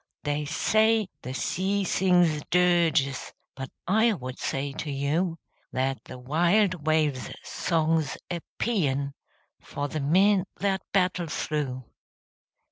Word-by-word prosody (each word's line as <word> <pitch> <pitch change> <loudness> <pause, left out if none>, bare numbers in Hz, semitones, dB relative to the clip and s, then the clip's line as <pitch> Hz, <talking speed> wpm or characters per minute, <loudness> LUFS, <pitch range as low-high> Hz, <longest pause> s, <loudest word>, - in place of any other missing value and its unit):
They 145 0 -1
say 215 +6 +2
the 130 +1 -6
sea 195 +7 0
sings 175 -4 +3
dirges, 170 -6 +2 0.2
But 135 -1 -6 0.2
I 220 +5 +3
would 130 -7 -7
say 135 +1 -2
to 150 - -5
you 155 +5 0 0.3
That 130 +1 -1
the - - -9
wild 170 +5 +1
wave's 155 -4 +1
song's 160 -3 0
a 175 - -1 0.2
paean 140 - 0 0.5
For 145 0 -4
the 155 - -4
men 190 +6 +4
that 195 -2 0
battle 180 -3 +1
through. 145 -4 -2
160 Hz, 120 wpm, -27 LUFS, 140-185 Hz, 0.5 s, men